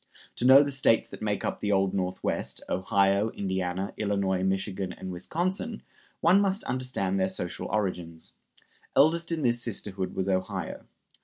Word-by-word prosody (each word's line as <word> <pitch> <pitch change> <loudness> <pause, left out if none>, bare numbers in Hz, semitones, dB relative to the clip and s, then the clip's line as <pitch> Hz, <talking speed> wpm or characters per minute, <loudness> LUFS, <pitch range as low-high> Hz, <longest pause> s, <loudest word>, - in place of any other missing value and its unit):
To 120 - -1
know 135 +2 +9
the 140 - -3
States 130 -4 +3
that - - -10
make 105 -1 -1
up - - -2
the 105 - -1
Old 95 -1 +2
Northwest 90 -1 -2
Ohio, 100 +2 +2
Indiana, 95 -1 -2
Illinois, 100 -3 0
Michigan 95 0 -1
and 95 - -7
Wisconsin 185 - -3 0.4
one 180 +4 +5
must 195 0 0
understand 125 -7 -1
their 95 0 +2
social 90 -2 -4
origins. 90 -6 -3 0.6
Eldest 170 +4 +4
in 160 -3 -1
this 120 -1 +2
sisterhood 95 -5 -4
was 95 - -1
Ohio. 95 -1 -2
100 Hz, 150 wpm, -28 LUFS, 95-130 Hz, 0.6 s, know